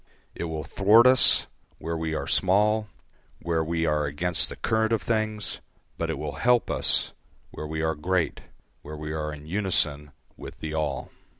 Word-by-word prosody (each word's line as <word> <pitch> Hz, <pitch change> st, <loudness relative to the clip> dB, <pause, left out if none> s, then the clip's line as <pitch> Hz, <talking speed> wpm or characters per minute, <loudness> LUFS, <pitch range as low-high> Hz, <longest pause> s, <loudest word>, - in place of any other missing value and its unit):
It -, -, -4 dB
will 80 Hz, -2 st, -4 dB
thwart 105 Hz, +5 st, +5 dB
us 130 Hz, 0 st, +6 dB, 0.3 s
where 85 Hz, 0 st, -4 dB
we 80 Hz, -1 st, -2 dB
are -, -, -3 dB
small, 105 Hz, +3 st, +2 dB, 0.5 s
where 80 Hz, -1 st, 0 dB
we 80 Hz, +1 st, -1 dB
are 75 Hz, -2 st, +1 dB
against 80 Hz, +3 st, -1 dB
the -, -, -7 dB
current 110 Hz, -1 st, 0 dB
of 115 Hz, -, +1 dB
things; 110 Hz, -2 st, -2 dB, 0.4 s
but -, -, -3 dB
it -, -, -2 dB
will -, -, -5 dB
help 120 Hz, -1 st, +2 dB
us -, -, +1 dB, 0.4 s
where 75 Hz, -, -6 dB
we 80 Hz, +1 st, -3 dB
are 80 Hz, 0 st, +1 dB
great, 85 Hz, +3 st, -1 dB, 0.4 s
where 75 Hz, +1 st, -8 dB
we 75 Hz, 0 st, -5 dB
are 75 Hz, -1 st, -3 dB
in 75 Hz, 0 st, -9 dB
unison 80 Hz, -5 st, 0 dB, 0.3 s
with -, -, -10 dB
the 80 Hz, -1 st, -5 dB
all. 75 Hz, -4 st, -2 dB
80 Hz, 175 wpm, -26 LUFS, 75-105 Hz, 0.5 s, us